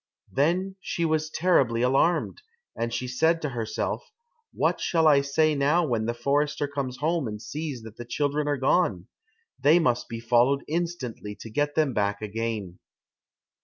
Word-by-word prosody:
Then 180 +7 0
she 170 -2 -2
was 155 -1 0
terribly 135 -9 +2
alarmed, 155 - +2 0.3
and 115 0 -2
she 120 +2 -3
said 160 +7 +2
to 150 - 0
herself, 120 - -3 0.4
"What - - 0
shall 165 -2 +2
I 145 -2 +6
say 155 +3 +2
now 150 +5 +2
when 115 -5 -1
the 120 - -1
forester 145 +4 0
comes 140 -3 -4
home 160 -2 0
and 105 -1 -5
sees 145 0 -5
that 110 -1 -11
the 120 - -7
children 145 +4 -1
are 145 -1 +1
gone? 130 - +1 0.5
They 150 +4 +5
must 120 -7 +1
be 115 - -5
followed 120 +4 +3
instantly 155 -11 -3
to 115 - -9
get 145 +5 0
them 155 -5 +2
back 100 -1 0
again." 110 -3 -4
140 Hz, 165 wpm, -26 LUFS, 115-155 Hz, 0.5 s, I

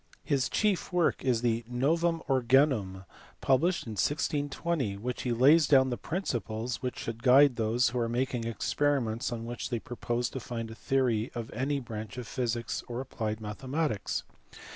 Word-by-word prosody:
His 135 -4 +1
chief 210 -4 0
work 175 -2 +1
is 125 -3 +1
the 115 -1 +1
Novum 165 +7 +1
Organum, 125 -7 +2 0.3
published 165 +7 +2
in 115 - -6
1620, 145 - -1
in 100 +2 -10
which 125 0 -3
he 125 - -1
lays 140 +6 +5
down 130 -2 +5
the - - 0
principles 120 - -3
which 125 -2 -3
should 115 0 -5
guide 135 +1 +6
those 115 +1 +2
who 125 +2 -2
are 115 -1 0
making 125 0 -1
experiments 120 +1 0
on 115 -1 -4
which 120 0 -5
they 120 - -1
propose 120 +1 -2
to 130 - -4
found 115 -1 -5
a - - -6
theory 120 -2 0
of 115 -1 -5
any 140 +4 -1
branch 110 -3 -7
of 125 - -5
physics 120 0 -2
or 120 0 -4
applied 110 -4 -3
mathematics. 130 +3 -2
125 Hz, 165 wpm, -29 LUFS, 115-140 Hz, 0.3 s, guide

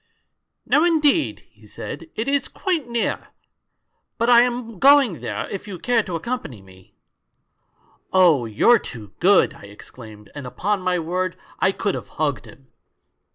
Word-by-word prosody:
" - - -57 0.2
'No, 300 - +3
indeed,' 320 -2 +2
he - - -20
said, - - -8
'it 220 +4 -3
is 280 0 0
quite 340 -9 -2
near. 235 -1 -2 0.9
But 235 +2 +2
I 235 -1 +8
am 240 -4 -2
going 275 - +5
there; - - -4
if 200 +1 -6
you 195 -3 -6
care 240 +5 +1
to 180 -5 -6
accompany 165 - -5
me 95 -1 -19 0.4
' - - -50
" - - -38
'Oh, 165 -10 +4
you're 220 - +4
too 105 -5 -10
good!' 190 +2 +4
I - - -14
exclaimed, 105 +1 -13
and 145 -3 -7
upon 200 +9 -2
my 185 -1 0
word 180 +2 -2 0.2
I 190 - +3
could 200 0 -2
have - - -6
hugged 145 -3 -1
him 135 -1 -17
190 Hz, 165 wpm, -22 LUFS, -, 0.9 s, I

